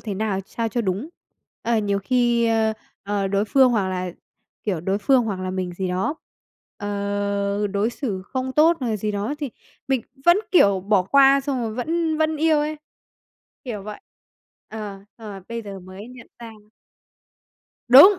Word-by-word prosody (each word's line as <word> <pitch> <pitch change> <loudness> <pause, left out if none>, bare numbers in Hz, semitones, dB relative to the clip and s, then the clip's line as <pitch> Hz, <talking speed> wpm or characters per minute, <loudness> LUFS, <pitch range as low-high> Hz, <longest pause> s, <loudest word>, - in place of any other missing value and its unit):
thế 210 -3 -4
nào 205 -1 -1
ch 195 - -17
sao 230 -1 -2
cho 240 +2 -1
đúng. 205 - -2 0.5
Ờ, 235 0 +1
nhiều 200 -1 0
khi, 240 +2 +2
a, 225 -1 +2 0.3
à, 200 -1 -1
đối 200 +1 +1
phương 260 +4 +5
hoặc 205 -5 +1
là, 185 -1 -2 0.5
kiểu, 190 -6 -1
đối 190 +4 0
phương 245 +4 +3
hoặc 200 -4 -3
là 185 0 -3
mình 185 -1 -3
gì 185 +1 -2
đó, 185 +11 -1 0.6
ờ, 200 0 -1
đối 205 +3 0
xử 215 -8 -4
không 260 +5 -4
tốt 320 +4 +5
hoặc 250 - -1
là 220 - 0
gì 210 +1 -2
đó 205 +7 -2
thì 290 -4 -4 0.4
mình 265 -3 +1 0.2
vẫn, 345 +2 +6
kiểu, 200 - +5
bỏ 200 0 +2
qua, 275 +7 +5
xong 270 -3 -2
rồi 220 -2 -3
vẫn 320 +5 -1
vẫn 315 0 +1
yêu 315 0 +3
ấy, 300 +1 -1 0.9
kiểu 220 -6 -5
vậy. 210 +1 -8 0.7
Ờ, 210 -3 -6 0.2
xong 225 -2 -9
rồi 195 -1 -8
bây 230 0 -4
giờ 200 -2 -8
mới 185 +4 -10
nhận 250 -1 -12
ra. 235 -1 -9 1.4
Đúng! 350 +11 +9
215 Hz, 180 wpm, -23 LUFS, 200-260 Hz, 1.4 s, Đúng